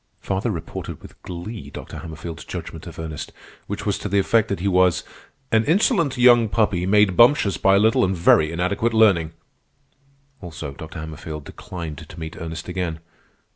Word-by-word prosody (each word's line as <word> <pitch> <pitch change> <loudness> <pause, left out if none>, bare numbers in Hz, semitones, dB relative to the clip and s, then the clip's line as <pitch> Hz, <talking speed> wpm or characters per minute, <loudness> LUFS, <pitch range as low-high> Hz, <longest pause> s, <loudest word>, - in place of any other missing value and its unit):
Father 95 +4 -2
reported 90 -7 -5
with - - -15
glee 95 +6 -7
Dr. - - -8
Hammerfield's 80 0 -8
judgment - - -7
of - - -10
Ernest, 80 -2 -6 0.4
which - - -5
was - - 0
to - - -4
the 100 - +1
effect 110 +3 +3
that 100 - -2
he 95 - -1
was 90 -2 +3 0.5
"an 110 0 +4
insolent 170 - +2
young 120 -2 +6
puppy, 100 -5 +1
made 105 -2 +4
bumptious 120 - +5
by 95 0 +4
a - - +5
little 110 +2 +4
and 95 0 0
very 80 -2 +4
inadequate 100 +7 0
learning." 95 -8 +4 1.1
Also, 80 -6 -7
Dr. 80 +4 -9
Hammerfield 80 -1 -7
declined 85 -4 -7
to - - -10
meet 80 -1 -6
Ernest 80 0 -6
again. 90 -3 -3
95 Hz, 170 wpm, -22 LUFS, 80-110 Hz, 1.1 s, young